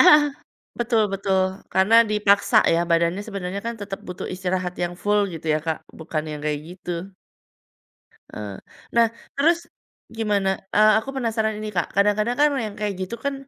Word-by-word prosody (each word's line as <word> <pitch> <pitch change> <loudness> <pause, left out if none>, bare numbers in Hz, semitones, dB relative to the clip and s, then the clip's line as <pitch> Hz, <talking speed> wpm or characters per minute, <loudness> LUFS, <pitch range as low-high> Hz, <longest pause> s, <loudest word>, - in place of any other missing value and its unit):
Ah, 305 -5 +8 0.6
betul 235 -2 +2
betul, 195 -1 +1 0.3
karena 190 +4 +4
dipaksa 205 -1 +3 0.2
ya 165 - +3
badannya 170 +3 +2
sebenernya 200 -2 -4
kan 235 - -2
tetep 195 -1 -5
butuh 180 -1 -5
istirahat 185 -1 -2
yang 175 0 -2
full, 210 0 +3
gitu 165 0 -8
ya - - +3
Kak, 160 -1 0 0.2
bukan 155 -1 -3
yang 150 - -6
kayak 150 -1 0
gitu. 180 0 -7 1.4
Eh. 105 -2 -6 0.4
Nah 235 0 +6 0.3
terus 330 +5 +4 0.6
gimana? 205 -3 +1 0.3
Eee, 215 0 +7
aku 245 - -4
penasaran 220 -3 0
ini 215 0 -4
Kak, 175 - +1
kadang-kadang 210 +4 +2
kan 295 +1 +6 0.2
yang 205 - -8
kayak 210 -1 -1
gitu 185 +5 -3
kan, 280 0 0
200 Hz, 160 wpm, -23 LUFS, 180-220 Hz, 1.4 s, Ah